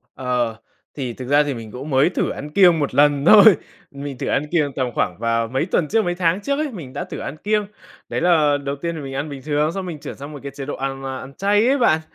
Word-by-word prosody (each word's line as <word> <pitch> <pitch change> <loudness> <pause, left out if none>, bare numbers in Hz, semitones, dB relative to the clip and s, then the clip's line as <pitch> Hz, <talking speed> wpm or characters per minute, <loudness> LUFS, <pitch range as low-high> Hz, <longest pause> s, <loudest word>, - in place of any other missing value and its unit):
Ờ, 125 -3 -1 0.4
thì 130 -4 -3
thực 125 +1 -8
ra 145 +1 +5
thì 145 -2 -2
mình 115 -2 -8
cũng 135 +4 -7
mới 135 +6 +3
thử - - -1
ăn 150 - -6
kiêng 175 -1 +5
1 145 - -2
lần 145 -1 +4
thôi, 205 +3 +8 0.5
mình 140 -2 -7
thử - - -4
ăn 140 - +1
kiêng 150 -5 +1
tầm 130 -2 0
khoảng 90 - -1
vào 115 0 0
mấy 130 +6 -1
tuần 175 -4 0
trước, 220 +4 +2
mấy 175 - -1
tháng 175 +2 +1
trước 280 +7 -1
ấy, 305 -2 -1
mình 150 - -8
đã - - -4
thử - - -8
ăn 145 - -6
kiêng. 210 +5 0 0.4
Đấy - - -2
là 155 -4 +4
đầu 140 0 -2
tiên 170 +4 -4
thì 160 - -6
mình 135 -2 -7
ăn 140 +3 -3
bình 140 -2 -7
thường, 150 +1 0
xong 195 0 -4
mình 165 -4 -6
chuyển - - -7
sang 140 +2 -9
một 145 - -7
cái 140 - -7
chế 140 - -6
độ 145 - -4
ăn 135 0 -4
ma 130 -1 -4
ăn 135 +1 -10
chay 205 +3 +2
ấy 280 +1 +3
bạn. 160 -10 +3
145 Hz, 275 wpm, -21 LUFS, 135-175 Hz, 0.5 s, thôi